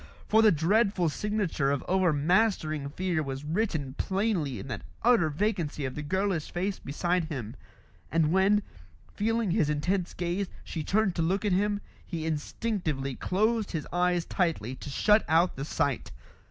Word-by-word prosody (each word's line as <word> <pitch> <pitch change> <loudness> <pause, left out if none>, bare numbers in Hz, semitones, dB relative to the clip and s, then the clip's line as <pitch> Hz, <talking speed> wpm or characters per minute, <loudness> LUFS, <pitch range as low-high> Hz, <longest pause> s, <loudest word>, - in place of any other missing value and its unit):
For 220 +1 +5
the 220 -1 +6
dreadful 185 +2 +2
signature 200 -6 -1
of 140 -1 -1
overmastering 170 -3 +2
fear 175 +1 -1
was 135 -1 -4
written 160 -6 -1
plainly 190 - 0
in 100 - -7
that 115 -5 -4 0.2
utter 230 -10 +4
vacancy 160 -4 -1
of 130 - -3
the 150 - -5
girlish 190 +1 -1
face 185 +2 -2
beside 175 +4 -1
him; 125 -9 -5 0.6
and 160 -1 +2
when, 195 +3 +4 0.5
feeling 225 -1 0
his 170 -6 +2
intense 175 +5 -1
gaze, 180 +3 -1 0.2
she 160 - -4
turned 200 +2 +2
to - - +2
look 190 +5 0
at 205 - +2
him, 205 +2 +1 0.2
he 165 -2 -5
instinctively 155 - -2
closed 215 - 0
his 155 -4 -2
eyes 175 -1 +2
tightly 165 - -1
to - - -8
shut 210 +9 +4
out 165 +3 +3
the 135 - -4
sight. 145 -4 -1
175 Hz, 155 wpm, -28 LUFS, 150-200 Hz, 0.6 s, the